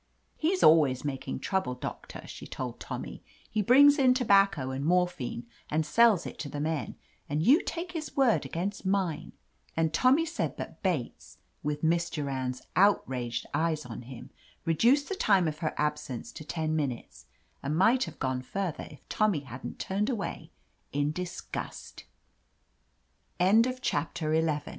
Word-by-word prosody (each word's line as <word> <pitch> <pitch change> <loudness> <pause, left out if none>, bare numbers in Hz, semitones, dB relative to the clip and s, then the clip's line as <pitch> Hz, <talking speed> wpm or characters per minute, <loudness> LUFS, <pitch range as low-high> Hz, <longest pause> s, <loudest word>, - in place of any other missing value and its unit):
"He's 370 +4 0
always 145 -5 +5
making 135 -2 -4
trouble. 190 -10 -1
Doctor," 125 - -7
she - - -9
told - - -5
Tommy. - - -6 0.3
"He 215 - -1
brings 285 +7 +6
in 255 -2 +5
tobacco 195 - +3
and 135 +1 -3
mor 180 +3 +4
phine 125 -8 -6 0.3
and 155 +1 0
sells 215 +2 +4
it - - -8
to 145 - -4
the 145 - -5
men, 150 -6 -2 0.3
and 150 +2 0
you 280 - +6
take 355 +1 -5
his 320 -4 -6
word 260 -4 +4
against 195 +4 -4
mine 190 -5 -1 0.2
!" - - -35
And 160 -1 +1
Tommy 260 - +4
said 335 +1 -3
that - - -7
Bates, 170 -11 -3 0.2
with 150 +1 -3
Miss 170 +1 +2
Du 150 -3 -3
rand's 130 -2 -3
outraged 130 - +2
eyes 155 0 0
on 120 -1 -7
him, 125 0 -10 0.3
reduced 235 - +3
the - - -3
time 195 - +3
of 150 -1 -4
her 160 -2 -2
absence 150 -5 -2
to - - -9
ten 155 0 -2
minutes, 140 -6 -4 0.3
and 150 +3 -2
might 235 +8 +4
have - - -10
gone 130 -2 -1
further 185 +4 -4
if 150 - -16
Tommy 210 -8 +1
hadn' 130 -2 -8
160 Hz, 145 wpm, -29 LUFS, 145-205 Hz, 0.3 s, brings